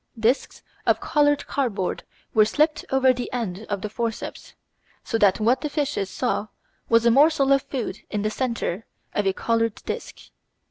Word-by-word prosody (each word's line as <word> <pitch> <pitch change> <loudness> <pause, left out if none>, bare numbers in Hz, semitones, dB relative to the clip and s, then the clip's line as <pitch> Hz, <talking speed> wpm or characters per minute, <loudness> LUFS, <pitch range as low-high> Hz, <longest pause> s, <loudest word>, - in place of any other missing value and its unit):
Discs 235 +5 0 0.2
of - - +4
coloured 290 -1 +2
cardboard 220 -9 -2 0.3
were 215 - +6
slipped 300 +8 +1
over 265 -1 +4
the 245 -1 -5
end 220 -4 -4
of 200 -2 -2
the - - -1
forceps, 225 +1 -5 0.5
so 225 - -1
that 200 -1 +4
what 240 +4 +2
the 300 - -2
fishes 285 -9 -1
saw 225 -1 -1 0.4
was 230 0 +4
a 235 - +6
morsel 275 +1 +5
of 275 - +3
food 255 -7 -4
in 210 -1 -2
the 215 - 0
centre 230 -5 -2 0.3
of 205 -1 0
a 190 - +2
coloured 230 +1 0
disc. - - -5
230 Hz, 170 wpm, -24 LUFS, 215-270 Hz, 0.5 s, were